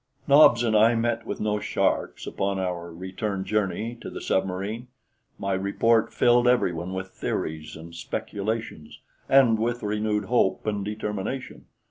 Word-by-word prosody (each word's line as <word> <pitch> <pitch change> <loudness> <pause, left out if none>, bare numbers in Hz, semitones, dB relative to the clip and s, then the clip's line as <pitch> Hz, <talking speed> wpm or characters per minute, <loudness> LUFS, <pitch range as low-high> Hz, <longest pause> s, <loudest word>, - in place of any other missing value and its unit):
Nobs 140 -4 +7
and 110 -2 +1
I 115 +2 +5
met 115 0 -1
with - - -4
no 105 0 0
sharks - - -1
upon 100 0 -2
our 90 -2 -3
return 95 +3 -4
journey 105 +3 -1
to - - -6
the - - -7
submarine. 95 +5 -2 0.5
My 100 0 -2
report 105 +4 +2
filled 120 0 +4
everyone 90 -7 +1
with 95 0 -5
theories 75 -4 -4
and 80 +1 -11
speculations, 100 0 -5 0.3
and 125 -5 +5
with 120 +2 -1
renewed 105 0 -1
hope 110 -4 +1
and 105 -2 -1
determination. 105 +4 -5
105 Hz, 140 wpm, -25 LUFS, 95-115 Hz, 0.5 s, Nobs